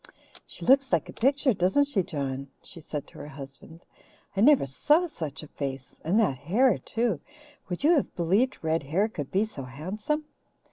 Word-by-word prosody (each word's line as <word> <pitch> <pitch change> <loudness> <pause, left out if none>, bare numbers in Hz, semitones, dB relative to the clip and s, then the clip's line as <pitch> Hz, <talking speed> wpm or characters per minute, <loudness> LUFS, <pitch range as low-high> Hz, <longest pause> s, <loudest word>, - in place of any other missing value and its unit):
"She - - -9
looks 270 +1 +5
like 170 -4 +2
a - - -8
picture, 275 +1 +2
doesn't 190 +9 +3
she, 280 -9 +1
John?" 140 -4 -4 0.2
she 165 - -11
said 150 -2 -5
to - - -14
her 145 - -7
husband. 140 +4 -11 0.5
"I 195 - +1
never 280 - +6
saw 295 - +3
such 160 - -6
a - - -9
face 135 -3 -6
and 185 +7 +2
that 190 - +2
hair 215 - +3
too. 225 -8 -1 0.5
Would 180 +7 -4
you 310 - +6
have 295 - 0
believed 195 +9 +2
red 160 +1 +1
hair 165 +10 +1
could 145 -11 -6
be 200 +3 +2
so 210 -10 -8
handsome? 190 - -3
180 Hz, 185 wpm, -27 LUFS, -, 0.5 s, never